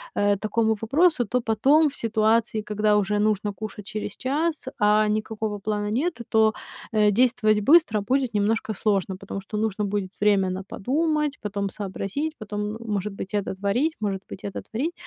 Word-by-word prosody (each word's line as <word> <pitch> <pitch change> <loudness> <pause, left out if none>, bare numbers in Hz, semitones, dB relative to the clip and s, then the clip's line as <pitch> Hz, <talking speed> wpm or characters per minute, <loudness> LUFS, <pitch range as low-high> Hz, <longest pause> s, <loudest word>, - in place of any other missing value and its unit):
э, 205 0 +2
такому 220 +2 +1
вопросу, 280 +3 +3
то 250 +4 0
потом 275 +8 +3
в 280 - -11
ситуации, 220 0 +1
когда 210 0 +1
уже 205 0 +1
нужно 210 -1 +1
кушать 210 -1 -7
через 215 -1 -5
час, 300 +3 -1
а 210 +1 +4
никакого 215 0 -2
плана 205 0 -2
нет, 305 +9 -1
то, 220 -1 +4 0.4
э, 210 -1 +4
действовать 225 -1 +3
быстро 275 -4 +5
будет 255 +3 0
немножко 215 +1 0
сложно. 195 -2 0
Потому 195 +1 -6
что 210 +2 -6
нужно 210 -1 -1
будет 200 -2 -2
время 200 -2 +3
на 185 +1 -4
подумать, 300 - -1
потом 200 -1 -2
сообразить, 205 +10 -4
потом, 210 -1 -4
м, - - -6
может 205 0 -2
быть, 195 0 -7
это 205 -2 -1
творить, 225 +12 0
может 195 -2 -2
быть, - - -9
это 200 - -5
творить. 280 +10 -1
215 Hz, 170 wpm, -24 LUFS, 205-240 Hz, 0.4 s, быстро